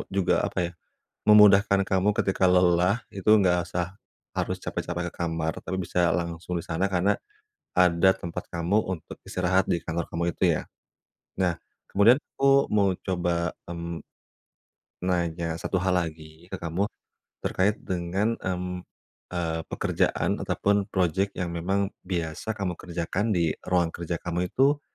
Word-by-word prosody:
juga 95 -2 +2
apa - - -3
ya, - - -16 0.6
memudahkan 105 -1 +7
kamu 95 +2 +3
ketika 95 0 +1
lelah 90 +4 +4
itu 100 +2 +1
nggak 90 -2 +3
usah, 90 +2 -3 0.4
harus - - -1
capek-capek 85 0 -3
ke - - -29
kamar 80 -1 -1
tapi 95 - -3
bisa 90 -1 +1
langsung 85 0 -3
di 85 - -6
sana 85 +4 0
karena, 95 +2 +2 0.6
ada 90 0 +5
tempat 85 0 -6
kamu 85 +4 +1 0.2
untuk 80 - -9
istirahat 95 +1 +2
di 85 - +1
kantor 85 +1 -2
kamu 85 +1 -2
itu - - -2 0.2
ya. - - -9 0.7
Nah 90 -2 +2 0.3
kemudian 115 +7 +5 0.2
aku 140 0 +4
mau 100 -2 +3
coba, 85 -2 -1
mmm. 85 -1 -5 1.0
Nanya 85 -2 -1
1 90 +2 -1
hal 90 0 +1
lagi 80 -1 -4
ke 95 - -4
kamu, 85 +4 -1 0.6
terkait 100 +3 +2
dengan, 95 +5 0
mmm, 90 -1 -3 0.5
eee, 85 -2 -2
pekerjaan - - 0
ataupun 100 -1 +1
project 95 +1 0
yang 90 -2 -2
memang 95 +4 -1
biasa 90 +4 -3
kamu 95 -3 -1
kerjakan 90 +5 -2
di 85 -2 +2
ruang 85 -2 +1
kerja 85 0 -3
kamu 90 +1 -2
itu, 140 +7 +3
90 Hz, 140 wpm, -26 LUFS, 85-95 Hz, 1.0 s, memudahkan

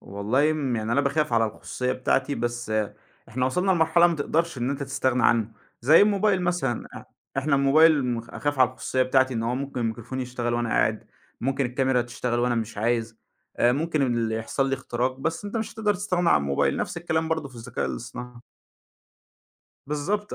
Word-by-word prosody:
والله 110 +10 0
امم 140 -6 -1
يعني 110 +1 -2
أنا 140 - +3
باخاف 145 -1 0
على 115 -1 +4
الخصوصية 125 +4 -3
بتاعتي، 135 +2 0
بس 120 -1 -3 0.6
إحنا 125 +3 -1
وصلنا 180 +8 0
لمرحلة 170 0 +4
ما 170 -2 -1
تقدرش 160 0 -1
إن 125 +3 -1
أنت 140 0 -3
تستغنى 130 -2 0
عنه 115 -1 +3 0.3
زي 150 +7 +6
الموبايل 205 -2 +2
مثلًا 175 -10 -1
إ - - -9 0.3
إحنا 140 +1 +1
الموبايل 145 +1 +5
م 120 -2 -1
أخاف 145 +4 -4
على 130 -1 +5
الخصوصية 130 0 -1
بتاعتي 130 0 +2
إن 115 - -1
هو 120 +2 -1
ممكن 125 -4 -2
الMicrophone 120 +2 -13
يشتغل 120 -2 -2
وأنا 120 -1 -1
قاعد، 110 0 +1 0.4
ممكن 135 +1 0
الكاميرا 130 0 +1
تشتغل 120 0 -3
وأنا 120 0 +1
مش 110 -2 -3
عايز، 115 0 -1 0.4
آآ 120 +1 +4
ممكن 155 +1 0
إن 120 -3 0
يحصل 115 +5 -1
لي 135 - +1
اختراق 130 0 -2
بس 165 +5 -2
أنت 205 +3 -4
مش 220 -1 -3
هتقدر 210 -2 +1
تستغنى 180 -3 0
عن - - +5
الموبايل 70 -1 0
نفس - - -3
الكلام 160 -2 -1
برضه 160 -3 -2
في 130 - -18
الذكاء 115 -1 -4
الاصطناعي. 125 - -7 1.5
بالضبط، 195 +9 -2
130 Hz, 185 wpm, -25 LUFS, 120-155 Hz, 1.5 s, زي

